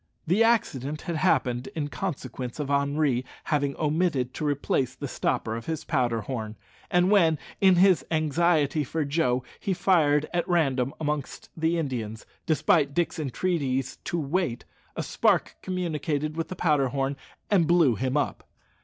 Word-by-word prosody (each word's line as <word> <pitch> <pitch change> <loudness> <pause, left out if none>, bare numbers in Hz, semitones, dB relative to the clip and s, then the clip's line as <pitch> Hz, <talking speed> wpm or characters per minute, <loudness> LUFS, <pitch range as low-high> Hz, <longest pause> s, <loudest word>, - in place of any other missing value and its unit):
The 185 +8 +3
accident 155 - +1
had 170 -2 -3
happened 125 -4 +1
in 150 -3 -2
consequence 130 -8 -5
of 145 -1 -2
Henri 140 -2 +1 0.2
having 145 -2 0
omitted 150 -5 0
to - - -5
replace 135 -3 0
the 140 - -5
stopper 110 -3 -1
of 115 - -7
his 160 -2 -3
powder 120 -6 0
horn, 110 -1 -5 0.3
and 180 +2 +3
when, 165 -6 +4 0.2
in 190 -2 +6
his 180 -4 +5
anxiety 155 -1 +2
for 155 +3 -2
Joe, 140 -4 +1 0.2
he 195 -3 -1
fired 155 -5 +3
at 175 -1 0
random 135 -7 +2
amongst 150 -3 -4
the 160 +1 +1
Indians, 115 -8 -4 0.2
despite 150 -2 +2
Dick's 175 0 0
entreaties 135 -3 -1
to 175 - -1
wait, 150 -4 -1 0.3
a - - -2
spark - - +1
communicated 155 -4 -2
with 165 0 -2
the 185 - -6
powder 150 -6 +2
horn 135 +1 -1 0.4
and 180 -6 +4
blew 170 -7 +4
him 130 +5 -1
up. 145 - -1
150 Hz, 155 wpm, -26 LUFS, 135-170 Hz, 0.4 s, in